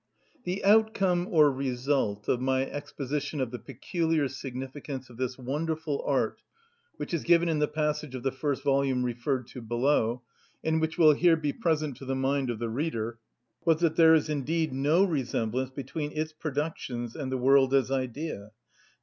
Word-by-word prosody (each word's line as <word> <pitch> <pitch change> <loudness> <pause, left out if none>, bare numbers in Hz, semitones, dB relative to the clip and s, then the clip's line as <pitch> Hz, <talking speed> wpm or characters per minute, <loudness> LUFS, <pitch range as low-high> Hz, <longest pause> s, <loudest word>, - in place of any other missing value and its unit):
The 185 +3 -2
outcome, 195 -4 +3
or 155 -7 +5
result, 130 -5 -1
of 125 - +1
my 130 0 +1
exposition 145 +1 -4
of 130 -3 -1
the 125 - -5
peculiar 160 - -1
significance 130 0 -6
of 115 - -14
this 130 0 -2
wonderful 150 +3 -2
art, - - 0 0.6
which - - -5
is 165 - 0
given 170 0 +4
in 160 -2 +1
the 150 - +2
passage 150 -2 -2
of 125 - -6
the 135 - +1
first 140 +1 -2
volume 135 -2 +2
referred 125 +1 -1
to 125 - -8
below, 120 0 +1 0.4
and 160 0 +1
which 160 +2 -1
will 155 -3 +7
here 170 +3 +4
be 150 -3 -1
present 155 -5 -1
to 135 - -10
the 135 0 -1
mind 135 0 0
of 120 - -2
the 115 +1 -3
reader, 115 -3 -3 0.4
was, 165 -2 +3
that 165 -2 +2
there 160 -1 +7
is 155 - +2
indeed 155 +1 -1
no 145 +7 +3
resemblance 130 - -1
between 140 +3 -5
its 155 0 -2
productions 140 -6 -4
and 140 -4 -4
the 130 - 0
world 135 +1 +4
as 135 -1 +2
idea, 135 +2 -2
_i. 100 +1 -13
140 Hz, 175 wpm, -28 LUFS, 130-160 Hz, 0.6 s, will